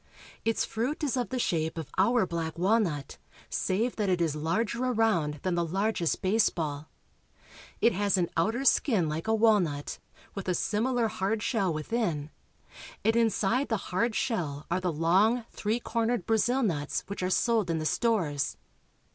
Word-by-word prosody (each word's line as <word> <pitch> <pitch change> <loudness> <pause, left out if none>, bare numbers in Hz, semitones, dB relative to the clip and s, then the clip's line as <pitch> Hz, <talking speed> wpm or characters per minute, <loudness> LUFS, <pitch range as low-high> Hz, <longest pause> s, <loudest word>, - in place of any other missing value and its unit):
Its 225 0 +1
fruit 255 +8 -3
is 280 -4 0
of 245 -2 -1
the 260 - -2
shape 160 -8 -1
of 160 -4 -6
our 230 +3 +3
black 165 -2 -4
walnut, 180 -7 0 0.3
save 225 +6 0
that 210 -3 0
it 180 -1 +2
is 160 -3 0
larger 210 +10 -1
around 220 -12 +1
than 185 - 0
the 170 0 +1
largest 190 +1 -1
baseball. 165 -7 0 0.9
It 235 - +4
has 200 0 +1
an 175 -2 +1
outer 225 +11 0
skin 215 - +3
like 155 +5 -3
a 220 - +3
walnut, 200 -10 +2 0.3
with 195 -2 -6
a 180 - +2
similar 230 +5 +1
hard 210 +1 -2
shell 200 -7 +1
within, 155 -2 -2 0.7
and 225 - +3
inside 230 +3 +1
the 225 - +1 0.2
hard 225 +4 +1
shell 155 - -2
are 180 +2 +1
the 180 -1 0
long, 190 +10 +2
three 215 +3 -1
cornered 230 -4 -1
Brazil 240 +4 +2
nuts 150 -9 -1
which 200 - -6
are 185 - 0
sold 220 -1 +2
in 165 - +1
the 155 - -3
stores. 165 - 0
200 Hz, 165 wpm, -28 LUFS, 165-230 Hz, 0.9 s, It